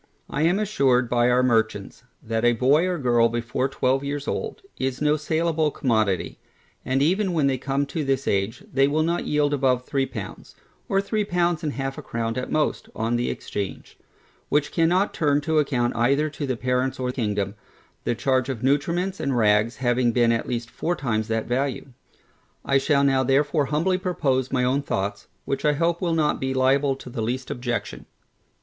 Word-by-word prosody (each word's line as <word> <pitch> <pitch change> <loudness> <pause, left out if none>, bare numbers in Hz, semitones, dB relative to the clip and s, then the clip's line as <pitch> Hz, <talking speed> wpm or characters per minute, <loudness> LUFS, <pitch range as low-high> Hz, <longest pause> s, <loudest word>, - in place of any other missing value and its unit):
I - - -1
am 170 +4 +3
assured 135 - +2
by 120 0 +3
our 125 +1 +3
merchants, 110 -3 0 0.2
that 115 0 -2
a 120 0 +5
boy 140 +9 +3
or 180 - 0
a - - -5
girl, 120 -3 +3
before 120 +3 -2
twelve 135 0 0
years 145 0 -4
old, - - -4 0.2
is 130 0 -2
no 150 0 +3
saleable 160 +1 0
commodity, 110 - 0 0.4
and 135 +1 +1
even 185 +4 +1
when 155 -4 +2
they 135 -2 +1
come 140 +2 -1
to 155 +2 -3
this 135 -1 -1
age, 100 +4 -1
they 135 +1 +4
will 155 +2 +1
not 170 +2 -1
yield 145 -1 +1
above 130 -3 +1
three 135 -2 0
pounds, 110 -7 -8 0.3
or 195 0 +2
three 215 +1 -1
pounds 175 -3 0
and 150 -2 -2
half 135 0 -4
a - - -6
crown 115 -1 -3
at 125 - -4
most, 155 -1 0
on 115 +2 -1
the 120 +1 0
exchange; 100 -2 -6 0.5
which 150 0 +1
cannot 180 +4 +2
turn 145 -2 +2
to 155 +1 +1
account 125 -5 0
either 140 +6 +2
to 145 -1 -4
the 130 -2 -1
parents 130 +2 -1
or 125 -1 -1
kingdom, 105 -5 -2 0.5
the 120 - 0
charge 130 +1 +1
of 125 -4 -4
nutriments 170 +8 0
and 135 -3 -1
rags 105 +1 +3
having 120 -1 +1
been 120 0 +3
at 115 - -1
least 120 -1 -3
four 175 - -2
times 110 -7 -1
that 110 -1 -1
value. 135 +2 -2 0.8
I 135 0 +3
shall 140 0 +2
now 135 -1 +3
therefore 145 +3 +2
humbly 175 +6 +1
propose 135 -9 0
my 125 -2 +1
own 130 +3 +1
thoughts, 100 -6 -3 0.2
which 135 - -2
I 150 - +3
hope 170 +3 0
will 170 -3 0
not 155 -2 +1
be 130 0 -2
liable 135 +1 +2
to 130 - -11
the 120 -2 -4
least 125 +4 -3
objection. 120 -1 -4
135 Hz, 195 wpm, -24 LUFS, 120-150 Hz, 0.8 s, a